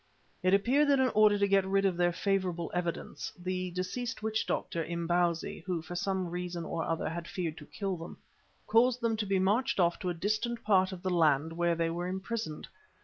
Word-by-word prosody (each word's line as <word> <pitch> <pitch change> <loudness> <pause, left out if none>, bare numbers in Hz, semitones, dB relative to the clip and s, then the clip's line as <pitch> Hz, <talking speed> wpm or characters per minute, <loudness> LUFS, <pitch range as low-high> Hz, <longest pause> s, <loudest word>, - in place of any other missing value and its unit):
It 185 +1 +4
appeared 260 +9 +3
that 280 -1 +4
in 260 -1 +4
order 215 -2 +5
to 200 0 +2
get 195 -1 +4
rid 195 +1 +1
of 190 -2 +2
their 175 0 +2
favourable 180 -2 -1
evidence, 175 -1 -3
the 185 0 -3
deceased 215 +8 -4
witch 220 0 -1
doctor, 165 - -1
Imbozwi, 170 0 0
who 175 -3 -1
for 160 - -8
some 190 0 -1
reason 175 -1 -4
or 165 0 -2
other 165 -1 -1
had 170 +1 -4
feared 170 -4 -4
to - - -12
kill 195 -3 -3
them, 165 +1 -9 0.5
caused 245 +2 +4
them 230 -1 +1
to 210 -1 -2
be 195 0 +2
marched 200 +5 +1
off 175 -1 +3
to 185 - -2
a 175 - -2
distant 215 +6 -1
part 190 -2 +3
of 185 -2 -8
the 185 - 0
land 160 -2 +3
where 170 0 +1
they 165 0 0
were 175 +1 -3
imprisoned. 190 -2 -4
185 Hz, 205 wpm, -31 LUFS, 170-205 Hz, 0.5 s, order